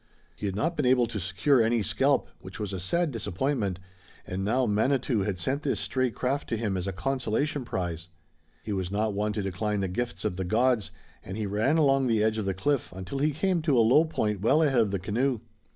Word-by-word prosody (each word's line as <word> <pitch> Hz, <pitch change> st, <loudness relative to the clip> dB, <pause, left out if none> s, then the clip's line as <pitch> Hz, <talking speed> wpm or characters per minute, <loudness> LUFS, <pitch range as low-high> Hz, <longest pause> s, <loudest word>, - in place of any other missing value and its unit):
He 105 Hz, -, -4 dB
had 95 Hz, -, -3 dB
not 165 Hz, +11 st, 0 dB
been 145 Hz, -5 st, +1 dB
able 125 Hz, -1 st, +4 dB
to 115 Hz, -2 st, -5 dB
secure 120 Hz, -, +2 dB
any 115 Hz, 0 st, +2 dB
scalp, -, -, +2 dB
which -, -, -10 dB
was 105 Hz, -2 st, -4 dB
a 95 Hz, -, -3 dB
sad 165 Hz, -, 0 dB
disappointment, 105 Hz, -2 st, -1 dB, 0.5 s
and 95 Hz, +1 st, -4 dB
now 125 Hz, +6 st, +2 dB
Manitou 120 Hz, +2 st, +1 dB
had 100 Hz, -1 st, -1 dB
sent 135 Hz, +11 st, -2 dB
this 145 Hz, -, -1 dB
stray 130 Hz, -1 st, 0 dB
craft 130 Hz, +4 st, -2 dB
to 115 Hz, -, 0 dB
him 105 Hz, -3 st, -1 dB
as 90 Hz, +1 st, -2 dB
a -, -, -1 dB
consolation 135 Hz, -, -1 dB
prize. 85 Hz, -6 st, -4 dB, 0.6 s
He 105 Hz, -, -3 dB
was 95 Hz, -2 st, -2 dB
not 105 Hz, +2 st, 0 dB
one 105 Hz, +1 st, 0 dB
to 105 Hz, -, -2 dB
decline 100 Hz, +2 st, -1 dB
the 95 Hz, -, 0 dB
gifts 120 Hz, +5 st, -3 dB
of 95 Hz, -4 st, -1 dB
the 95 Hz, -, -1 dB
gods, 115 Hz, +3 st, +1 dB, 0.3 s
and 95 Hz, -, -6 dB
he 110 Hz, -, -2 dB
ran 110 Hz, +10 st, +1 dB
along 135 Hz, -3 st, +3 dB
the 110 Hz, -3 st, +2 dB
edge 110 Hz, 0 st, +1 dB
of 105 Hz, -, -2 dB
the 95 Hz, -1 st, -1 dB
cliff 140 Hz, +7 st, 0 dB
until 95 Hz, +9 st, -5 dB
he 150 Hz, +2 st, +3 dB
came 175 Hz, +4 st, 0 dB
to 150 Hz, -5 st, +2 dB
a 115 Hz, -, +5 dB
low 140 Hz, +7 st, +6 dB
point 105 Hz, -, -1 dB
well 150 Hz, +9 st, +4 dB
ahead 135 Hz, -5 st, +3 dB
of 110 Hz, -, +1 dB
the 100 Hz, -, -1 dB
canoe. 115 Hz, +7 st, 0 dB
110 Hz, 230 wpm, -27 LUFS, 100-135 Hz, 0.6 s, low